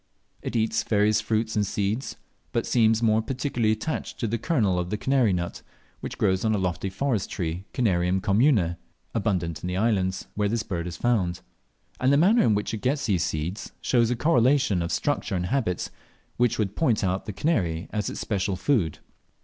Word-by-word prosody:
It - - -5
eats 110 0 +1
various 105 0 +2
fruits 110 +1 -1
and 105 - +2
seeds, 100 +5 -2 0.4
but - - 0
seems 115 -1 +3
more 110 0 +4
particularly 120 -2 -1
attached 110 +9 -3
to 115 - -1
the 115 +2 -1
kernel 105 - +1
of 90 0 -3
the 105 - -1
kanary 130 -2 +2
nut, 85 -1 -3 0.4
which - - -6
grows 95 -1 +1
on 110 -1 +2
a - - +1
lofty 90 -1 -1
forest 105 +1 -1
tree 85 +1 -3
(Canarium 95 -6 +1
commune), 100 - +2 0.4
abundant 90 -7 -1
in - - -4
the 90 0 -2
islands 95 -3 0
where 105 -1 0
this 115 +1 -1
bird 85 -2 -3
is 85 - -6
found; 95 -8 0 0.6
and 130 +2 +3
the 140 - +5
manner 200 +10 +5
in 110 - +3
which 105 +2 -2
it 110 - -4
gets 140 +3 0
at - - -2
these 90 -3 +2
seeds 85 +7 -3
shows 120 -3 +2
a 125 - +1
correlation 130 - +3
of 85 - -2
structure - - -1
and 90 -1 -1
habits, 100 -4 -1 0.4
which 120 -1 +2
would 105 -2 -1
point 125 -11 +1
out 95 +2 -1
the - - -2
"kanary" 90 - 0
as 105 -2 -1
its - - -6
special 100 -2 -1
food. 95 - +1
105 Hz, 195 wpm, -26 LUFS, 95-120 Hz, 0.6 s, the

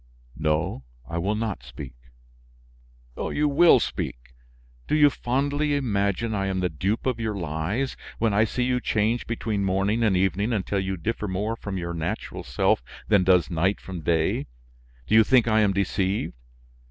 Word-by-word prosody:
"No, 75 -2 0 0.2
I 85 - -3
will 100 +5 0
not 110 - -3
speak." 65 +1 -9 1.2
"You 150 0 0
will 160 +4 +6
speak! - - -4 0.5
Do - - +1
you 145 -1 +6
fondly 145 +4 0
imagine 110 -4 0
I 100 -2 -1
am 95 -1 -1
the 90 -1 0
dupe 95 +8 -2
of 125 -3 0
your 110 -2 -2
lies? 90 - -2 0.2
When 115 -2 +1
I 105 +2 +4
see 125 +3 -2
you 125 0 +1
change 110 +2 0
between 110 -3 -2
morning 95 +4 +1
and 105 -5 +3
evening 95 +5 +1
until 100 -1 -1
you 95 0 -2
differ 105 +4 -3
more 100 +4 -2
from 100 -4 -5
your 85 -1 -4
natural 80 -1 -4
self - - +1 0.3
than 100 -4 +5
does 90 -2 +3
night 90 +4 +1
from 90 -3 -7
day, 80 0 0 0.6
do - - -2
you 110 0 +8
think 120 0 +4
I 110 -1 +3
am 105 -2 +3
deceived? 100 0 -1
100 Hz, 165 wpm, -25 LUFS, 90-115 Hz, 1.2 s, you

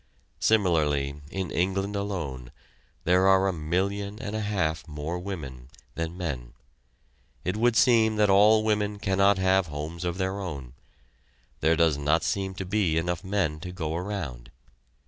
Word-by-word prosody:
Similarly, 75 -9 +2
in 95 -1 -4
England 95 +3 -1
alone, 80 -12 -4 0.5
there 90 +2 +4
are 95 0 +5
a 95 - 0
million 100 +6 -2
and 110 -4 -5
a 110 - -1
half 90 -7 -1
more 75 +3 -4
women 70 -10 -7 0.3
than 85 +1 -4
men. 65 -10 -4 0.9
It 90 +2 0
would 115 +2 +2
seem 110 -2 +4
that 105 -1 +3
all 105 +3 +5
women 105 -1 0
cannot 100 0 +3
have 95 -1 +2
homes 75 +3 -6
of 90 0 -2
their 95 +1 -2
own 70 -10 -6 0.9
there 80 +1 +3
does 80 -3 +2
not 75 +2 +2
seem 95 +6 -2
to 95 0 -5
be 95 -4 +1
enough 85 +2 -1
men 95 -6 -1
to 90 +3 -7
go 80 -3 -3
around. 85 -11 -5
90 Hz, 150 wpm, -27 LUFS, 80-100 Hz, 0.9 s, are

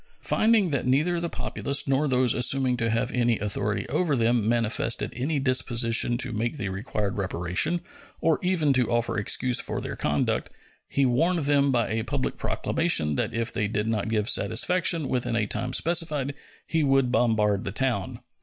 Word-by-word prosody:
Finding 215 -6 +2
that 135 -3 -1
neither 155 +7 +2
the 170 0 -3
populace 140 -3 -2
nor 135 +2 +1
those 125 -2 +2
assuming 130 0 +2
to 115 -1 0
have 115 +1 0
authority 105 -3 -1
over 150 +3 0
them 115 -2 +1
manifested 115 0 0
any 140 +5 -1
disposition 120 -3 +1
to 125 -1 0
make 120 +7 -2
the 100 -7 -3
required 100 0 -3
reparation, 95 - -1 0.4
or 160 -2 +1
even 175 -6 +2
to 125 -3 +1
offer 120 -2 0
excuse 125 +4 0
for - - -2
their - - -5
conduct, 75 -1 -1 0.4
he 140 - +1
warned 160 +6 +1
them 140 -1 +3
by 120 -3 +1
a 110 0 -1
public 135 +2 -3
proclamation 165 - 0
that 70 - -2
if 115 0 -1
they 105 - 0
did 105 0 -2
not 110 -1 -1
give 110 -2 0
satisfaction 165 - +2
within 125 -2 -1
a 115 -2 +1
time 125 +4 -2
specified 150 -2 +1 0.3
he 160 -1 0
would 135 -3 +2
bombard 110 -4 +1
the 95 - -4
town. 120 -3 -2
125 Hz, 170 wpm, -25 LUFS, 110-145 Hz, 0.4 s, them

